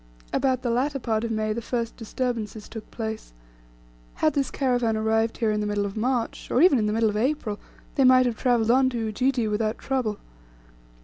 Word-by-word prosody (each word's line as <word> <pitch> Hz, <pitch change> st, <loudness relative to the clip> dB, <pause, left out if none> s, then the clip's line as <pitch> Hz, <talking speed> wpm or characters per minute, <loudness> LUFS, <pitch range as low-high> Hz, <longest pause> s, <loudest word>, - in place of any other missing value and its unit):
About 260 Hz, -1 st, +1 dB
the 240 Hz, -, 0 dB
latter 275 Hz, +4 st, 0 dB
part 225 Hz, -3 st, -1 dB
of 230 Hz, -, -2 dB
May 215 Hz, -1 st, -1 dB
the 235 Hz, -, -4 dB
first 230 Hz, 0 st, -3 dB
disturbances 225 Hz, -2 st, -4 dB
took 220 Hz, -2 st, -9 dB
place. 220 Hz, -, -6 dB, 0.8 s
Had 310 Hz, -, +2 dB
this 275 Hz, -3 st, 0 dB
caravan 245 Hz, -5 st, 0 dB
arrived 225 Hz, +1 st, +1 dB
here 225 Hz, -2 st, +1 dB
in 210 Hz, 0 st, 0 dB
the 210 Hz, -, -1 dB
middle 205 Hz, -1 st, 0 dB
of 200 Hz, -, -5 dB
March, 240 Hz, +1 st, -2 dB
or -, -, +2 dB
even 280 Hz, -8 st, +5 dB
the -, -, 0 dB
middle 225 Hz, 0 st, +2 dB
of 210 Hz, -, -3 dB
April, 230 Hz, -4 st, -1 dB, 0.3 s
they 275 Hz, -, +2 dB
might 255 Hz, 0 st, +6 dB
have 240 Hz, -2 st, 0 dB
travelled 235 Hz, -2 st, +2 dB
on 260 Hz, +1 st, +4 dB
to 245 Hz, -, -4 dB
Ujiji 235 Hz, +2 st, 0 dB
without 215 Hz, +1 st, -1 dB
trouble. 250 Hz, -6 st, -2 dB
230 Hz, 195 wpm, -25 LUFS, 215-255 Hz, 0.8 s, might